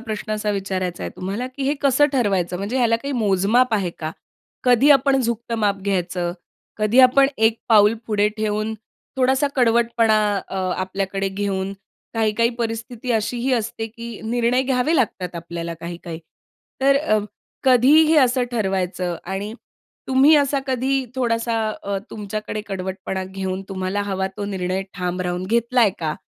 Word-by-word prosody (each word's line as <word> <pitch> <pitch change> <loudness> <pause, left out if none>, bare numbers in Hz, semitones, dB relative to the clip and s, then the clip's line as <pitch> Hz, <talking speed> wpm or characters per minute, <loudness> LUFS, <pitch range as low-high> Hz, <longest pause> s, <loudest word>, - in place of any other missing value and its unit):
प्रश्न 215 -2 -5
असा 210 0 -1
विचारायचा 190 -3 -3
आहे - - -4
तुम्हाला, 200 +7 -3
की 260 +2 -7
हे 290 - +2
कसं 280 +1 +4
ठरवायचं? 195 -8 +1
म्हणजे 200 +7 -3
ह्याला 235 -3 +3
काही 275 +4 -5
मोजमाप 220 +2 +2
आहे 190 -4 0
का? 155 -1 -4 0.5
कधी 250 +3 +5
आपण 275 -1 +5
झुकतं 235 -1 -2
माप 205 -2 +1
घ्यायचं, 180 -3 -1 0.5
कधी 215 +4 +2
आपण 260 +2 +6
एक 220 +1 +2
पाऊल 210 -1 +6
पुढे 210 -1 +2
ठेवून 215 0 -1 0.4
थोडासा 265 +2 +2
कडवटपणा 230 -2 +3 0.3
अ, 195 - -5 0.2
आपल्याकडे 195 +1 -2
घेऊन 195 0 -2 0.4
काही-काही 225 +1 +2
परिस्थिती 230 +1 -4
अशीही 240 +4 0
असते, 225 -1 -1
की 230 0 -9
निर्णय 240 +2 +1
घ्यावे 260 +4 +1
लागतात 190 - -1
आपल्याला 170 0 -5
काही-काही. 170 -1 -7 0.6
तर 275 +1 +4
अ, 215 -7 +2 0.5
कधी 255 +2 +5
हे 315 0 +3
असं 255 -1 +3
ठरवायचं 185 -5 -1
आणि 195 +4 -4 0.6
तुम्ही 265 +4 +6
असा 280 -1 +2
कधी 265 +1 0
थोडासा 230 -2 0 0.3
अ, 200 0 -2
तुमच्याकडे 215 0 -5
कडवटपणा 190 0 -4
घेऊन 190 0 -4
तुम्हाला 190 +1 -2
हवा 190 -1 -2
तो 205 - -4
निर्णय 190 -1 -2
ठाम 180 -1 -3
राहून 180 0 -2
घेतलाय 235 0 +3
का? 155 -2 -2
215 Hz, 145 wpm, -21 LUFS, 190-245 Hz, 0.6 s, आपण